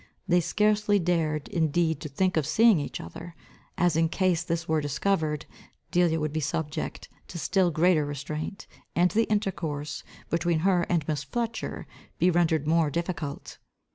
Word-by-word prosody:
They 175 -1 +4
scarcely 210 +3 +2
dared 165 -4 0
indeed 160 -3 +1
to 155 - -5
think 185 +7 0
of 155 -4 +1
seeing 225 -5 +5
each 145 - -5
other, 165 - -9 0.4
as 175 -2 +2
in 165 0 +2
case 180 -2 +1
this 170 -1 -3
were 160 -1 +1
discovered, 150 0 -1 0.5
Delia 175 -3 +3
would 155 -1 -2
be 155 - 0
subject 150 +1 -3 0.2
to 175 - -7
still 185 +2 +2
greater 165 0 +3
restraint, 150 +6 -5 0.3
and 175 +1 +3
the 225 +1 +2
intercourse, 160 -8 -2 0.3
between 170 -1 +1
her 180 -3 +3
and 170 -4 0
Miss 150 -3 -1
Fletcher, 230 - -4 0.3
be 180 - +3
rendered 160 -3 +2
more 160 0 +3
difficult. 160 -2 -4
165 Hz, 155 wpm, -27 LUFS, 155-180 Hz, 0.5 s, seeing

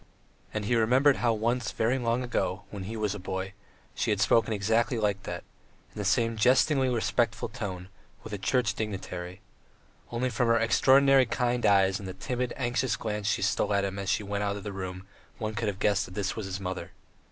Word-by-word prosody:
And 105 -1 -3
he 120 - +1
remembered 130 +5 +4
how 120 - +2
once 115 +1 0
very 120 +4 +1
long 120 +1 0
ago, 105 -5 -2
when 100 -3 -6
he 110 +3 -5
was 105 -2 -1
a 105 - -6
boy, 95 +1 -4 0.4
she - - -1
had 105 - +1
spoken 115 +3 +3
exactly 110 +4 +1
like 105 -2 0
that, - - -5 0.5
in - - -9
the - - -1
same 115 -1 +2
jestingly 130 +3 +4
respectful 115 -2 0
tone, 95 -4 -5 0.4
with 110 - -8
a 105 - -3
Church 120 +2 +1
dignitary.... 95 -3 -5 0.7
Only 125 +2 -1
from 120 +1 +1
her 115 0 +4
extraordinarily 135 +3 +5
kind 120 0 0
eyes 95 -1 +4
and 100 - -7
the 95 - -6
timid, 125 +5 -3
anxious 125 -2 0
glance 105 -2 -3
she - - +1
stole 100 - +1
at 100 0 +2
him 100 0 -4
as 100 -1 -3
she 105 - +1
went 100 0 -2
out 100 0 -1
of 100 - -8
the 105 - -5
room 95 -1 -5 0.4
could - - -27
one 110 -1 -3
have 105 -3 -2
guessed 105 0 +1
that 90 - -12
this 100 -2 -2
was 110 -4 -4
his 95 0 -4
mother. 90 -2 -5
110 Hz, 210 wpm, -28 LUFS, 100-120 Hz, 0.7 s, extraordinarily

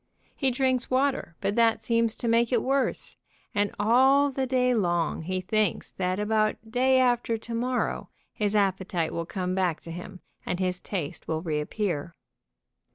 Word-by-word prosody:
He 270 - +1
drinks 260 0 0
water, 260 -9 0
but 200 0 0
that 230 -1 +3
seems 230 -1 +1
to 235 - -4
make 230 +1 +3
it 240 -3 +2
worse, 270 +1 -1 0.4
and 205 -2 +1
all 265 +6 +4
the 265 0 -2
day 250 -1 +2
long 175 -8 0
he 185 +3 -2
thinks 210 0 0
that 185 +1 -2
about 215 0 +1 0.2
day 260 +2 +3
after 240 -2 +2
to 230 +1 -8
morrow 245 +2 -1 0.2
his 210 0 -1
appetite 190 -4 0
will 170 -1 -3
come 185 -1 -2
back 185 -4 0
to 165 - -9
him 180 +2 -8 0.2
and 180 - -3
his 180 -1 -1
taste 175 -8 -5
will 160 0 -2
reappear. 160 +1 -2
215 Hz, 160 wpm, -27 LUFS, 180-250 Hz, 0.4 s, all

